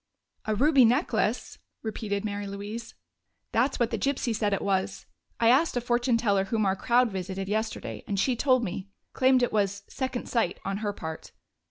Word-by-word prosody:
"A 215 - 0
ruby 280 +3 +5
necklace!" 250 +8 +1 0.2
repeated 215 -2 -3
Mary 205 -1 -3
Louise. 205 +4 -6 0.6
"That's 255 +4 +1
what 235 -2 +1
the - - -1
gypsy 260 -4 0
said 210 -1 0
it 200 - -1
was. 195 0 -1 0.3
I 230 - +4
asked 270 +2 +3
a - - +3
fortune 240 0 +2
teller 200 -4 +2
whom 215 +1 0
our 190 0 +2
crowd 240 +2 +2
visited 190 0 -4
yesterday, 220 +2 -3
and 200 -2 -1
she 250 +5 +2
told 255 0 +3
me. 190 -1 -4 0.2
Claimed 260 -1 +4
it 245 - 0
was 200 -1 0
'second 260 -2 -4
sight' 225 -7 0
on 195 0 -1
her 205 -1 -2
part." 160 -5 -7
220 Hz, 180 wpm, -27 LUFS, 200-245 Hz, 0.6 s, ruby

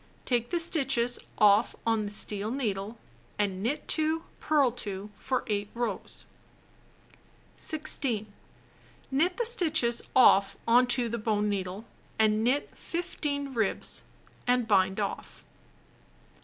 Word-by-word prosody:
Take 240 -2 0
the 345 - 0
stitches 270 -7 +1 0.2
off 210 +1 +4
on 225 -1 +2
the - - -4
steel 205 0 -2
needle 220 -4 -3 0.4
and 195 -2 -1
knit 250 +8 -2
2, 315 +1 0 0.2
purl 290 -5 +3
2, 205 -3 -6
for 260 +5 -2
8 205 -1 -2
rows. 240 0 -4 1.3
16. 275 -8 0 0.9
Knit 335 +7 +1
the 475 - 0
stitches 315 - +2
off 200 -6 +5
on 245 +2 +5
to 245 -1 +1
the 235 +1 -3
bone 210 -1 0
needle 195 +1 -3 0.3
and 215 0 +3
knit 260 +5 +1
15 290 -5 -4
ribs, 220 -5 -1 0.5
and 245 -2 +2
bind 190 -1 +3
off. 200 - -5
235 Hz, 120 wpm, -28 LUFS, 210-280 Hz, 1.3 s, off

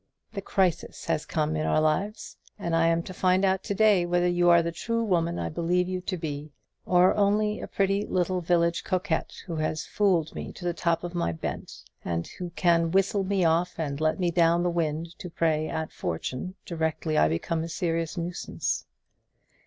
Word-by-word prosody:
The 200 - -4
crisis 185 -3 -1
has 160 -2 -1
come 155 -1 0
in 155 - -1
our - - +3
lives, 155 +8 -1 0.2
and 170 -5 -1
I 165 0 +4
am 165 0 +2
to 185 - -8
find 185 +1 +2
out 190 0 +2
to 200 - -2
day 210 -3 +5
whether 175 0 +1
you 175 0 +3
are 170 -1 +6
the 170 - -2
true 230 +7 -2
woman 170 -5 +1
I - - -2
believe 175 +2 0
you 185 0 -3
to 185 0 -3
be, 150 -2 -5 0.4
or 180 0 +5
only 210 +1 +1
a - - -5
pretty 195 +1 0
little 185 0 0
village 170 0 +1
coquette, 185 -3 -1
who 170 -4 -4
has 155 0 -2
fooled 180 -6 +1
me - - -6
to 175 - -9
the 175 - 0
top 170 0 0
of 175 0 -5
my 170 - 0
bent, 80 - -6 0.2
and 85 -1 -2
who 180 -1 -7
can 170 -2 +3
whistle 195 +2 +2
me 190 -2 +1
off 170 +2 +2
and 145 -2 -3
let 155 +4 +1
me 175 -2 +1
down 170 0 +3
the 175 - +1
wind 165 0 -2
to 180 - -6
prey 155 -2 0
at 160 -1 -3
fortune 130 - -4
directly 160 -1 -2
I 75 - +5
become 160 - -1
a - - -4
nuisance. 170 +1 -2
170 Hz, 195 wpm, -27 LUFS, 160-185 Hz, 0.4 s, are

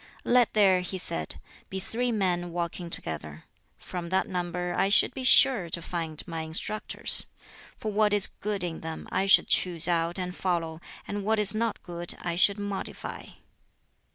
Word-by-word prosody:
"Let 245 -2 +3
there," 190 -3 +4
he 185 +1 -4
said, 80 - -4 0.3
"be 190 - -4
three 240 +5 -2
men 180 -5 -1
walking 170 0 -4
together: 75 - -3 0.3
from 175 -2 -7
that 190 +1 +1
number 180 -1 -3
I 195 - +1
should 215 - +5
be 265 - -5
sure 255 -8 +6
to 170 - -2
find 165 -2 -2
my 165 -2 -4
instructors; 160 +7 +1 0.5
for 215 - -4
what 210 0 +2
is 205 -2 +6
good 205 -2 -4
in 170 -2 -4
them 160 0 -7
I 195 - 0
should 195 - +6
choose 175 -2 +1
out 170 0 0
and 180 -1 -4
follow, 165 -3 -2 0.3
and 205 0 -4
what 220 +2 +1
is 210 -1 +5
not 225 0 -2
good 175 -1 -2
I 175 -1 -3
should 200 +3 +4
modify." 205 -1 -6
180 Hz, 170 wpm, -27 LUFS, 170-205 Hz, 0.5 s, sure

